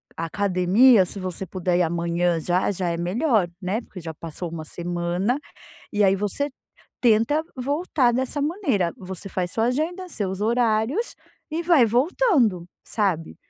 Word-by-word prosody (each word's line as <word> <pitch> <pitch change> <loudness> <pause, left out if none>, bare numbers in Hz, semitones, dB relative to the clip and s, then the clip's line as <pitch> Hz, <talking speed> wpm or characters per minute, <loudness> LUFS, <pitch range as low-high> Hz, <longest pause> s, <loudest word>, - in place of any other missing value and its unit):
a 165 - -3
academia, 195 +5 +4
se 195 - -7
você 185 +1 -4
puder 180 0 0
ir - - +4
amanhã, 170 0 0
já, 180 +4 +1
já 180 -2 -2
é 170 - -2
melhor, 195 - +1
né, 195 +6 -1
porque 190 - -11
já 160 -1 -6
passou 165 +2 -6
uma 160 -2 -5
semana, 175 - -2 0.5
e 210 0 +2
aí 195 0 +4
você 210 +9 -1 0.5
tenta 235 +7 +3
voltar 280 -1 +1
dessa 260 +3 -1
maneira, 280 - 0
você 190 +1 -7
faz 180 -2 -2
sua 225 - +1
agenda, 340 +8 -2
seus 195 - -3
horários 235 - +1 0.4
e 330 +2 -2
vai 325 -8 +5
voltando, 245 - +2 0.2
sabe. 190 -7 -1
205 Hz, 150 wpm, -24 LUFS, 175-255 Hz, 0.5 s, vai